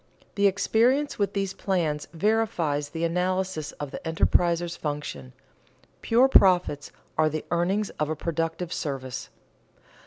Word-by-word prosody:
_The 200 0 +4
experience 235 +9 +2
with 200 -1 0
these 195 -1 -1
plans 160 -8 -1
verifies 170 -7 0
the 165 +2 -4
analysis 180 -1 -1
of 145 -2 -6
the - - -6
enterpriser's 170 +1 +1
function: 145 - -5 0.7
pure 240 +3 +4
profits 180 - +4 0.3
are 155 0 +4
the 155 0 -4
earnings 190 +4 0
of 150 0 0
a 155 - -1
productive 165 +2 -3
service. 135 -5 -4
170 Hz, 125 wpm, -26 LUFS, 155-195 Hz, 0.7 s, The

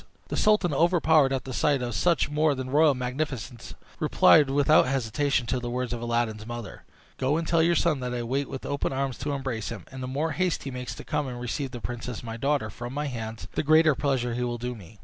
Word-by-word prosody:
The - - -2
sultan, 210 -6 +3
overpowered 160 -2 +4
at 130 -3 -2
the 130 - -6
sight 140 -2 +1
of 120 -1 -3
such 170 - +2
more 150 0 +2
than 130 -1 -5
royal 150 0 +5
magnificence, 125 -2 -4 0.2
replied 150 -4 +5
without 145 +2 +4
hesitation 135 +1 0
to 130 +2 -1
the 120 -1 -4
words 125 0 -2
of 120 - -4
Aladdin's 115 -2 -1
mother: 120 -4 -7 0.3
"Go 135 +4 +1
and 165 -1 -3
tell 165 -1 +3
your 170 +1 +3
son 155 -3 +2
that 125 -1 -3
I 120 -1 -2
wait 135 +4 -2
with 135 - -6
open 140 -1 -2
arms 135 -3 -2
to 145 +3 -2
embrace 130 -7 -3
him; 105 -7 -7
and 130 0 -8
the 125 - -4
more 145 +5 -1
haste 180 +3 -1
he 135 - -5
makes 125 0 -5
to - - -9
come 150 -2 -2
and 125 -1 -6
receive 130 +3 -3
the 120 -1 -8
princess 120 0 -5
my 115 -1 -5
daughter 135 -3 0
from 120 +4 -7
my 150 +1 -1
hands, 110 - -5
the - - -1
greater 155 0 +5
pleasure 130 -3 -1
he 125 - -2
will 120 -1 -2
do 125 +1 -4
me." 105 -1 -13
130 Hz, 235 wpm, -26 LUFS, 120-150 Hz, 0.3 s, royal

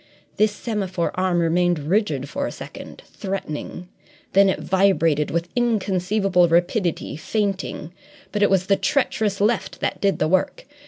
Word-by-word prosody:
This 215 0 +3
semaphore 195 -6 -2
arm 185 -1 0
remained 175 +1 +2
rigid 150 - 0
for 280 - -3
a - - -5
second, - - -10
threatening; 180 -3 -6 0.5
then 195 0 +6
it - - -1
vibrated 175 -6 +2
with 170 +1 -1
inconceivable 195 -5 +2
rapidity, 175 0 0
feinting. 190 -1 -3 0.4
But 210 - -2
it 205 - +5
was 190 -1 +2
the 195 0 +3
treacherous 220 -7 0
left 215 +3 0
that - - -2
did 195 -5 +2
the 155 - +1
work. 185 +3 0
190 Hz, 145 wpm, -22 LUFS, 170-205 Hz, 0.5 s, then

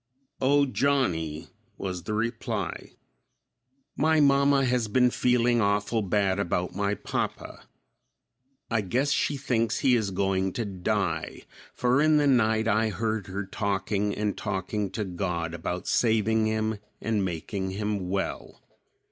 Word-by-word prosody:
"O, 140 +2 +4
Johnny," 90 - 0 0.3
was 90 -2 -4
the 105 - -3
reply; 110 -4 -3 1.0
"My 160 0 +3
mamma 140 -1 +4
has 125 -2 +1
been 125 +3 +3
feeling 120 -1 +2
awful 105 +2 +1
bad 100 -1 +1
about 90 -2 -1
my 100 +2 0
papa. - - -4 1.0
I 115 -1 +2
guess 130 +9 0
she 145 +2 +1
thinks 115 -4 0
he 130 -3 +4
is 110 -4 0
going 95 0 0
to 120 - -2
die, 95 -4 -2 0.3
for 125 +3 +2
in 155 0 +4
the 145 - +3
night 110 -4 +3
I 110 +1 +2
heard 110 0 -2
her 95 +1 -4
talking 100 0 -1
and 105 -1 -1
talking 95 +2 -2
to 105 +1 -3
God 90 -3 -3
about 90 +2 -4
saving 110 -1 +2
him 110 -1 -1 0.2
and 110 -3 0
making 95 +2 -3
him 100 -1 -3
well. 95 0 -4
105 Hz, 135 wpm, -27 LUFS, 95-120 Hz, 1.0 s, O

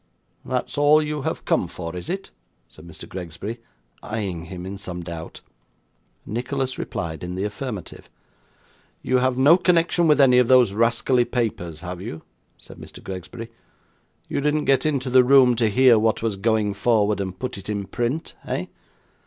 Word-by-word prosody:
'That's 125 +1 -3
all 145 +1 +6
you 150 -1 -2
have - - -4
come - - +1
for, 85 +1 -7
is 90 - -7
it?' 195 +2 -4 0.4
said 80 +2 -15
Mr. 80 - -11
Gregsbury, 95 +6 -7 0.4
eyeing 100 -6 -4
him 90 +1 -8
in 95 +1 -6
some 90 -3 -6
doubt. 85 -1 -8 0.8
Nicholas 130 +3 -3
replied 80 +1 -5
in 90 0 -5
the 95 - -2
affirmative. 105 -1 -6 0.9
'You 130 0 +2
have 130 0 +1
no 145 +6 +6
connection 175 -1 +2
with 150 -1 +4
any 125 -3 +6
of 125 - +3
those 125 -5 +5
rascally 120 +3 +2
papers 85 - -3
have 90 0 -6
you?' 80 -6 -7 0.3
said - - -13
Mr. - - -12
Gregsbury. 95 +5 -7 0.8
'You - - -2
didn't 150 +1 +1
get 135 +1 +3
into 135 -4 -1
the 130 0 +7
room, 125 -1 +6
to 115 -2 +2
hear 125 +1 +5
what 110 0 +1
was 110 -3 0
going 105 0 +1
forward, 105 -1 +1
and 95 -1 -5
put 125 -3 -5
it 100 - -10
in 100 -2 -2
print, 120 - -3
eh? - - -2
115 Hz, 170 wpm, -23 LUFS, 95-130 Hz, 0.9 s, the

